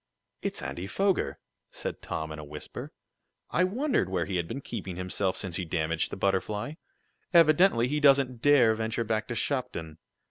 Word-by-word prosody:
"It's - - -3
Andy 90 +2 -4
Foger!" 195 - +1 0.3
said - - -6
Tom, 80 0 -4
in 75 - -6
a - - -7
whisper. 75 0 -8 0.6
"I 180 - +3
wondered 230 - +1
where 90 -3 0
he 95 -2 -2
had 85 -1 -1
been 135 - -4
keeping 100 -9 -6
himself 90 +1 -1
since 90 -4 -3
he 90 - -2
damaged 80 -1 -1
the - - -5
Butterfly. 105 +6 0 0.6
Evidently 155 -6 +6
he 150 +3 0
doesn't 135 -4 +4
dare 130 -5 +6
venture 110 +1 -1
back 110 0 -1
to 120 - -4
Shopton. 85 - -3
110 Hz, 170 wpm, -28 LUFS, 90-140 Hz, 0.6 s, Evidently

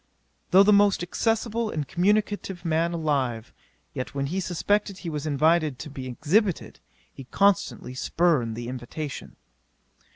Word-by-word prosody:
'Though 190 +1 +7
the 210 +1 +5
most 200 -3 +4
accessible 225 +4 -1
and 150 -6 -3
communicative 195 -1 0
man 165 +1 +1
alive; 140 -9 -2 0.4
yet 130 +2 -5
when 140 -1 -1
he 175 +7 -2
suspected 195 +2 -1
he 175 -4 -6
was 150 0 -4
invited 155 -1 +2
to 150 - -8
be 135 -2 -7
exhibited, 175 - 0 0.3
he 135 - -10
constantly 195 -5 +1
spurned 130 -5 +1
the 120 0 -6
invitation. 130 +4 -6
165 Hz, 135 wpm, -25 LUFS, 140-195 Hz, 0.4 s, Though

